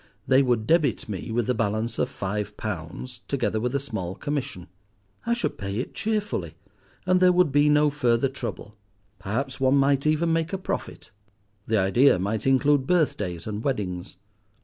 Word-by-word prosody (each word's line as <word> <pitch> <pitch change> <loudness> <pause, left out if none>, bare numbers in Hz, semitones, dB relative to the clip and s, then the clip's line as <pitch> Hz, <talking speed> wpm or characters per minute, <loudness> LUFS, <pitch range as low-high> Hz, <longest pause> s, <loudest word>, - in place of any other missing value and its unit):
They 130 +1 +5
would 120 -5 +1
debit 150 -5 +2
me 105 +2 -5
with 120 0 0
the 125 - +1
balance 110 0 -1
of - - +1
five 105 +2 -4
pounds, 110 +5 -6
together 125 -5 -1
with 125 +4 -2
a - - +2
small 105 -9 -5
commission. 140 - -4 0.6
I 235 - +2
should 235 - -3
pay 100 0 -4
it 125 - -4
cheerfully, 210 - -2 0.5
and 185 0 +3
there 180 0 +6
would 180 -4 +3
be 145 +2 +4
no 150 0 +4
further 125 -3 +2
trouble. 120 -5 -7 0.4
Perhaps 125 +8 -3
one 130 +1 +3
might 140 +1 +2
even 160 +2 +2
make 165 +1 -1
a - - 0
profit. 185 - -5 0.6
The 110 - +2
idea 100 +6 +4
might 100 +6 -2
include 135 0 +3
birthdays 105 - 0
and 105 0 -4
weddings. 95 -9 -3
125 Hz, 170 wpm, -25 LUFS, 105-145 Hz, 0.6 s, there